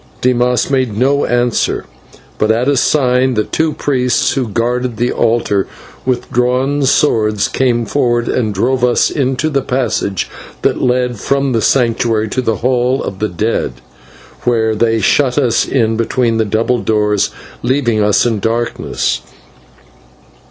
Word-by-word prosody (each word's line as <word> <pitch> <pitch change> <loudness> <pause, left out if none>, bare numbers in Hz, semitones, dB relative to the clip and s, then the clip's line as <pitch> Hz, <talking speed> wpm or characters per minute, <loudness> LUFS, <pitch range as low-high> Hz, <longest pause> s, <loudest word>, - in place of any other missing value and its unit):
Dimas 125 0 +1
made 130 -6 0
no 140 +4 +2
answer, 120 -1 0 0.5
but 110 - +1
at 115 +3 +1
a 145 - +3
sign 130 -1 +2
the 105 - +1
two 160 +6 -1
priests 125 -5 0
who 130 -3 -1
guarded 120 +2 -1
the 120 +1 0
altar 110 -4 +1 0.4
with 125 -2 -1
drawn 130 +3 +1
swords 110 -7 +2
came 120 -3 0
forward 120 -2 0
and 110 -4 0
drove 125 +6 0
us 125 -1 +2
into 135 +1 -1
the 140 -3 0
passage 120 -7 -1 0.4
that - - +1
led 125 -2 0
from 140 +4 0
the 115 -2 +1
Sanctuary 115 -3 +1
to 130 - -1
the 115 -3 0
Hall 125 +3 0
of 95 - -6
the 110 - -1
Dead, 105 - -1 0.7
where 110 -2 +1
they 115 +1 +1
shut 125 +5 +2
us 125 -6 +2
in 115 -4 +1
between 115 0 0
the 110 - +1
double 115 +4 0
doors, 105 -2 +1 0.3
leaving 120 -3 +1
us 105 +2 +3
in 115 -3 0
darkness. 115 +3 -2
120 Hz, 145 wpm, -15 LUFS, 110-130 Hz, 0.7 s, a